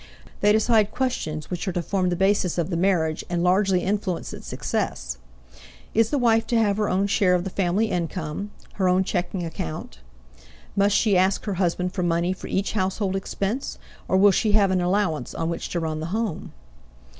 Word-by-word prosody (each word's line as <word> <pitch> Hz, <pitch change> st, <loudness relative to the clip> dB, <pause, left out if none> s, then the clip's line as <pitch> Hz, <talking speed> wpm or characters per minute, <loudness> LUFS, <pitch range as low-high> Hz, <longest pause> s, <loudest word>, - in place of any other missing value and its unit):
They 205 Hz, -, +4 dB
decide 220 Hz, -1 st, +3 dB
questions 200 Hz, -, -3 dB
which 180 Hz, +3 st, -3 dB
are -, -, +1 dB
to 175 Hz, -, -1 dB
form 185 Hz, 0 st, 0 dB
the 175 Hz, -, 0 dB
basis 190 Hz, -1 st, +1 dB
of 170 Hz, +1 st, -1 dB
the -, -, 0 dB
marriage 165 Hz, -3 st, +1 dB
and 175 Hz, -1 st, 0 dB
largely 185 Hz, 0 st, +3 dB
influence 195 Hz, -3 st, -2 dB
its -, -, -9 dB
success: -, -, -3 dB, 0.7 s
Is 225 Hz, 0 st, +3 dB
the 290 Hz, -, 0 dB
wife 225 Hz, -3 st, +3 dB
to 240 Hz, -, +1 dB
have 205 Hz, -3 st, +2 dB
her 210 Hz, -1 st, 0 dB
own 190 Hz, +2 st, +1 dB
share 195 Hz, -2 st, +3 dB
of 175 Hz, -, 0 dB
the 195 Hz, -, -5 dB
family 195 Hz, +4 st, +1 dB
income, 170 Hz, +2 st, -3 dB, 0.3 s
her 185 Hz, -, +4 dB
own 185 Hz, +1 st, +3 dB
checking 180 Hz, -1 st, -2 dB
account? 80 Hz, -, -6 dB, 0.8 s
Must 200 Hz, 0 st, +3 dB
she 210 Hz, -4 st, +3 dB
ask 190 Hz, +1 st, +2 dB
her 205 Hz, -, -1 dB
husband 180 Hz, +1 st, 0 dB
for 190 Hz, -, -2 dB
money 175 Hz, +1 st, +1 dB
for 185 Hz, -, -9 dB
each 195 Hz, +1 st, -1 dB
household 190 Hz, -1 st, -1 dB
expense, 200 Hz, +6 st, -3 dB, 0.3 s
or 190 Hz, -, +2 dB
will 200 Hz, +1 st, +6 dB
she 210 Hz, +2 st, +1 dB
have 200 Hz, -2 st, +4 dB
an 185 Hz, -1 st, +2 dB
allowance 180 Hz, -3 st, 0 dB
on 165 Hz, +1 st, -1 dB
which 170 Hz, -, -4 dB
to 175 Hz, -, -1 dB
run 160 Hz, -1 st, -2 dB
the 160 Hz, -, -4 dB
home? 215 Hz, -1 st, -3 dB
190 Hz, 195 wpm, -24 LUFS, 175-205 Hz, 0.8 s, will